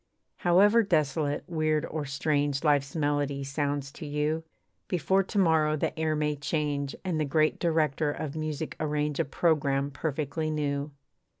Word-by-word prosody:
However 200 +6 +5
desolate, 155 -6 0
weird, 155 -2 0
or 155 -1 -4
strange 145 0 0
Life's 145 -2 +2
melody 145 -2 0
sounds 140 0 -2
to 155 +1 -8
you, 150 +2 -1 0.4
Before 190 +2 +2
to 195 +2 -5
morrow 160 -5 +3
the - - -1
air 155 -1 +1
may 150 0 0
change, 145 -1 -2
And 175 -4 -1
the - - +2
Great 155 +2 +1
Director 155 -3 +1
of 145 0 -5
music 155 0 -3
arrange 150 -1 -1
A - - +2
programme 140 -2 +1
perfectly 155 +2 -2
new. 145 -1 -1
150 Hz, 145 wpm, -28 LUFS, 145-160 Hz, 0.4 s, However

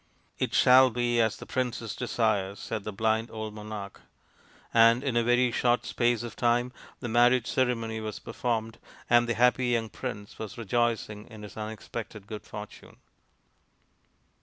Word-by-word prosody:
" - - -37
It - - -6
shall 130 +1 +7
be 120 0 +1
as 110 -2 +1
the - - -9
princess 120 -4 -3
desires," 110 -5 0
said 110 -3 -5
the 110 - -3
blind 110 +2 0
old 110 -1 -6
monarch; 105 -2 -8 0.7
and 115 +2 +6
in 135 -4 -1
a 120 - +3
very 120 +1 +3
short 120 +1 +1
space 120 -1 +1
of 120 - -7
time 120 +1 +1 0.3
the 120 - -3
marriage 120 +1 +4
ceremony 115 -4 0
was 110 -1 -5
performed, 115 -1 -3 0.3
and 120 0 +5
the 115 - +1
happy 125 +1 +3
young 115 -2 0
prince 105 -6 -7
was 110 +3 -6
rejoicing 115 -1 -1
in 110 -2 -11
his 105 - -10
unexpected 110 -1 -7
good 105 0 -7
fortune. 105 0 -10
115 Hz, 160 wpm, -28 LUFS, 110-120 Hz, 0.7 s, shall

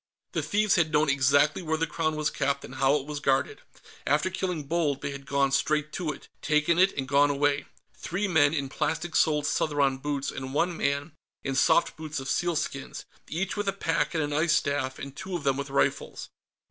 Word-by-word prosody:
The - - -1
thieves 210 -1 +2
had 160 -3 +2
known 150 0 +3
exactly 140 +4 +3
where 160 -2 -1
the 165 - +1
Crown 155 0 -1
was 155 -1 0
kept 140 0 -1
and 125 - -11
how 135 +1 +3
it 140 -2 -2
was 150 -1 -5
guarded; 135 -2 0 0.5
after 150 +6 +2
killing 180 -4 -2
Bold, 145 -2 -1
they 140 - -2
had 140 0 -9
gone 140 -1 +2
straight 150 +2 +1
to 165 -3 -2
it, 150 - -11
taken 155 +3 +2
it 190 +1 +5
and 135 -1 -2
gone 140 +2 +4
away 145 0 +1 0.3
three 195 +5 -3
men 160 -6 +4
in 140 -4 -1
plastic 160 +4 -2
soled 150 -2 +3
Southron 140 -3 +1
boots 140 -1 -2
and 130 +1 -6
one 175 +3 +1
man 140 +2 -1 0.3
in 135 - -2
soft 155 +5 +3
boots 155 -2 -5
of 135 - -7
sealskins, 165 -5 -2 0.2
each 180 +4 -2
with 205 -1 -3
a 195 - +1
pack 165 -4 -1
and 160 - +1
an 145 0 -3
ice 155 +2 +2
staff, 130 -2 0
and 135 0 -8
two 190 +2 -5
of 170 - -4
them 135 -2 +2
with 140 0 -4
rifles. 140 - -1
150 Hz, 210 wpm, -27 LUFS, 140-165 Hz, 0.5 s, it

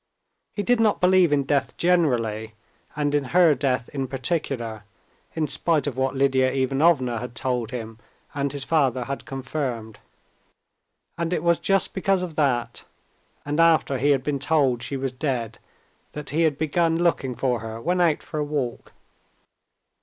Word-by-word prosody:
He 205 - -2
did 245 +4 +2
not 220 -2 +2
believe 180 -2 +4
in 145 -1 +2
death 140 0 -1
generally, 115 -11 +1 0.4
and 145 -1 -1
in 145 -2 +1
her 170 +3 +5
death 125 -3 -1
in 135 -2 -3
particular, 130 -5 -2 0.5
in 160 -1 0
spite 155 -1 +1
of 145 -4 -3
what 130 +1 -1
Lidia 130 -1 +2
Ivanovna 135 -2 +2
had 125 +1 -7
told 125 -3 -1
him 115 -2 -7 0.3
and 140 -2 -1
his 140 -1 -3
father 130 -6 +1
had 140 +3 -5
confirmed, 130 -5 -4 1.2
and 170 0 -1
it 165 - -1
was 170 -1 +3
just 195 -1 +1
because 190 -1 +1
of 170 -4 -6
that, 120 -6 0 0.6
and 145 +2 -2
after 160 -5 +3
he 145 +3 +2
had 135 -3 +2
been 145 -1 -1
told 140 -4 +1
she 140 - -4
was 135 -1 -2
dead, 125 -4 -3 0.5
that 150 -2 -6
he 160 +3 +1
had 145 - -13
begun 165 +2 +1
looking 165 -7 0
for 125 0 0
her 110 +1 -7
when 180 +7 0
out 165 -4 +2
for 155 - -5
a - - +1
walk. 145 -5 -4
140 Hz, 165 wpm, -24 LUFS, 125-160 Hz, 1.2 s, her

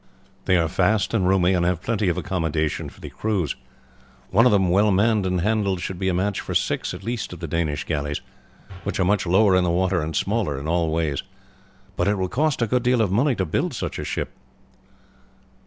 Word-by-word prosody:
They 95 -1 +4
are 85 -1 +2
fast 95 +4 +1
and 95 -5 +2
roomy, 95 -1 +3
and 90 -2 +1
have 90 0 0
plenty 110 -4 0
of 85 - -1
accommodation 80 -3 -1
for - - -18
the - - -8
crews. 100 -9 -1 0.8
One 115 +6 +5
of - - +3
them 95 -4 +3
well 100 +3 +4
manned 105 0 +2
and 90 -1 0
handled 100 -2 +1
should 90 +1 -5
be 95 - -1
a - - 0
match 100 +2 0
for - - -5
six - - 0
at - - -10
least 115 -4 -4
of 90 - -9
the 85 - -5
Danish 75 -2 -1
galleys, 75 -2 -2 0.6
which - - -3
are 95 - +3
much 100 0 +1
lower 95 +2 +4
in 90 - +3
the 90 - +1
water 90 0 +1
and 80 +1 -4
smaller 100 -10 0
in 70 - -6
all 85 0 +1
ways. 80 -3 -1 0.7
But 90 - 0
it 105 - +2
will 95 -1 -1
cost 145 +2 +1
a - - +3
good 125 +3 +1
deal 125 0 +2
of 105 -5 +1
money 125 +6 +2
to 95 - -1
build 80 - -1
such - - -4
a - - -3
ship." - - -3
95 Hz, 220 wpm, -23 LUFS, 85-105 Hz, 0.8 s, One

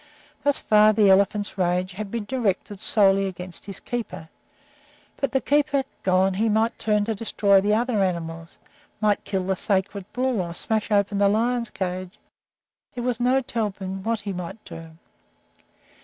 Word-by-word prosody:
Thus 285 -1 +2
far 215 0 +5
the 205 -2 +5
elephant's 200 +1 +2
rage 180 +1 +1
had 200 +2 -6
been 230 0 -4
directed 205 -4 -2
solely 195 -2 +3
against 180 0 -7
his 195 - -6
keeper, 230 -9 -5 0.9
but, 275 -3 -1
the 265 - +2
keeper 285 0 +1 0.2
gone, 190 +1 +2
he 220 +4 +1
might 220 +2 +1
turn 210 -1 +1
to 225 - -1
destroying 200 -2 +2
the 210 +2 +2
other 235 -2 +1
animals, 165 -3 -3 0.4
might 210 -2 +1
kill 190 -2 -1
the 190 +1 0
sacred 195 0 -2
bull, 250 -4 0
or 170 -1 -5
smash 220 +2 -2
open 200 -1 +1
the 200 0 +4
lions' 235 +2 0
cages 185 -1 -4 0.8
there 245 - -4
was 245 -1 -1
no 255 +2 +3
telling 195 -5 -3
what 225 +1 -1
he 200 -1 -4
might 180 +4 -7
do. 165 0 -9
205 Hz, 160 wpm, -24 LUFS, 190-225 Hz, 0.9 s, far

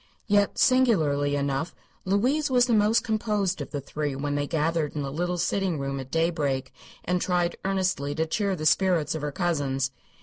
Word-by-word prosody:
Yet, 205 -1 +2
singularly 155 - +3
enough, 140 +3 -2 0.3
Louise 255 +11 +1
was 250 -1 +4
the 245 - 0
most 215 +1 +3
composed 210 -4 -1
of - - -6
the 145 - -4
three 145 +1 -4
when 145 +1 -2
they 145 0 -1
gathered 160 -1 -1
in 145 - -2
the 135 - -4
little 175 +4 -2
sitting 180 0 0
room 140 0 -3
at 130 -1 -7
daybreak, 145 -5 -1 0.3
and 180 0 0
tried 175 -1 0
earnestly 185 -7 -1
to 160 +1 0
cheer 200 +3 -1
the 155 -3 -5
spirits 175 -1 +2
of 160 - -4
her 150 0 -3
cousins. 140 -6 -1
165 Hz, 180 wpm, -26 LUFS, 145-195 Hz, 0.3 s, was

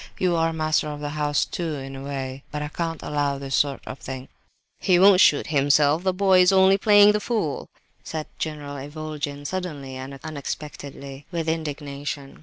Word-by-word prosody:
You 180 -2 +1
are 165 0 +2
master 155 -1 0
of 150 -1 -5
the 145 0 -4
house 150 -1 0
too, 165 -3 -3
in 135 -1 -7
a 135 - -7
way; 135 -1 -5
but 150 0 -3
I 150 - -4
can't 165 0 -4
allow 145 -1 -1
this 135 0 -6
sort 140 -2 +1
of 130 - -7
thing—" 130 0 -7 0.5
"He 185 -3 +3
won't 190 0 +7
shoot 145 - +5
himself; 145 +1 +3
the 190 0 +1
boy 185 0 +4
is 180 +1 +5
only 190 +1 +5
playing 205 0 +7
the 210 - 0
fool," 205 - -2 0.3
said 155 -1 -4
General 145 -2 -4
Ivolgin, 145 0 -5
suddenly 145 -7 -4
and 135 +1 -8
unexpectedly, 145 -2 -7
with 165 -2 -2
indignation. 145 -3 -4
150 Hz, 180 wpm, -24 LUFS, 140-170 Hz, 0.5 s, won't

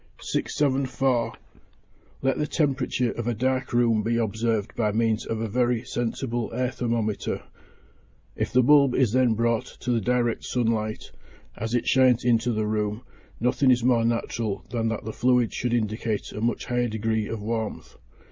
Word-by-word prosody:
674. 130 -3 0 0.9
Let 135 0 +1
the 150 - 0
temperature 135 -6 0
of 120 0 -5
a 120 - 0
dark 130 +2 -1
room 115 -2 +3
be 115 +2 0
observed 110 -1 -1
by 105 -3 +1
means 110 0 0
of 110 - -2
a 115 - -2
very 120 +1 +1
sensible 120 0 -2
air 125 0 0
thermometer; 115 -4 -2 0.9
if - - -2
the 125 0 +4
bulb 140 -1 +5
is 125 -6 +3
then 125 -2 +3
brought 115 0 -1
to 125 - -1
the 115 -2 +1
direct 120 +1 0
sun 125 -2 -1
light 110 -1 -2 0.4
as 115 +2 -3
it 120 - 0
shines 130 -3 +4
into 120 0 +3
the 110 -1 -1
room, 105 +1 -2 0.4
nothing 125 +3 +2
is 125 -2 +4
more 120 -2 +3
natural 115 -2 -2
than 115 -2 0
that 110 -2 -3
the 110 - -4
fluid 125 -1 +2
should 120 - -2
indicate 110 -1 -2
a 105 - -6
much 120 +1 -1
higher 120 -1 0
degree 110 -1 -1
of 115 - -4
warmth. 110 +1 -4
115 Hz, 165 wpm, -25 LUFS, 110-125 Hz, 0.9 s, bulb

